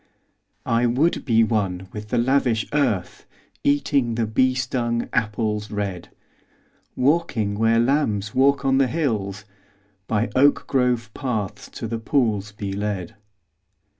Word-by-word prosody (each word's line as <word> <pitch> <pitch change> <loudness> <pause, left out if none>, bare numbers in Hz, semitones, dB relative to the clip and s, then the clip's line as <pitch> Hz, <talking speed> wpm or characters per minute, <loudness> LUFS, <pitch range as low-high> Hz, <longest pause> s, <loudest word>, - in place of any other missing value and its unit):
I 115 +1 +2
would 140 +8 +1
be 115 -3 +4
one 95 -4 -1
with 105 0 -7
the - - 0
lavish 120 -2 +2
earth, 115 -12 -1 0.4
Eating 140 -4 +1
the 115 -1 0
bee 130 +4 +2
stung 120 -2 -1
apples 105 -2 -1
red: 100 -4 -4 0.9
Walking 130 -7 +1
where 115 +2 +2
lambs 115 -6 +1
walk 140 +1 +3
on 135 0 +3
the 135 - +4
hills; 110 - -2 0.6
By 110 +2 0
oak 140 +2 +4
grove 125 -5 0
paths 105 -6 -4
to - - -5
the 115 +1 -3
pools 110 -5 0
be 100 -1 -5
led. 100 -3 -3
115 Hz, 130 wpm, -23 LUFS, 105-130 Hz, 0.9 s, be